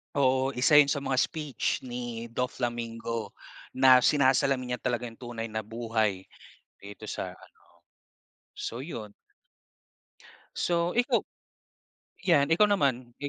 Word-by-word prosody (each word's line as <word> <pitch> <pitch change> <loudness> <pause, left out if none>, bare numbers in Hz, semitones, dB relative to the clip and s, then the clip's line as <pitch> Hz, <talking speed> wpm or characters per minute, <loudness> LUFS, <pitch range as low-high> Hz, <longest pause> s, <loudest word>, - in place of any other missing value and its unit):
Oo, 130 -1 +2
isa 130 +4 +3
'yon 145 -1 +7
sa 140 - 0
mga 135 -1 -1
speech 150 +1 -1
ni 120 -1 -5
Doflamingo 115 -2 -3 0.4
na 130 -1 +6
sinasalamin 130 -2 +2
niya 125 - -14
talaga 125 -1 -1
'yong 115 - -11
tunay 115 -1 -5
na 110 0 -4
buhay 110 -3 -2 0.5
dito 100 0 -11
sa, - - -5
ano. - - -18 1.0
So 115 - -5
'yon. 115 -8 -7 1.4
So 170 0 0
ikaw? 245 0 +2 1.0
'Yan, 155 -5 +3
ikaw 210 +5 +5
naman. 130 -10 0
125 Hz, 115 wpm, -28 LUFS, 115-140 Hz, 1.4 s, yon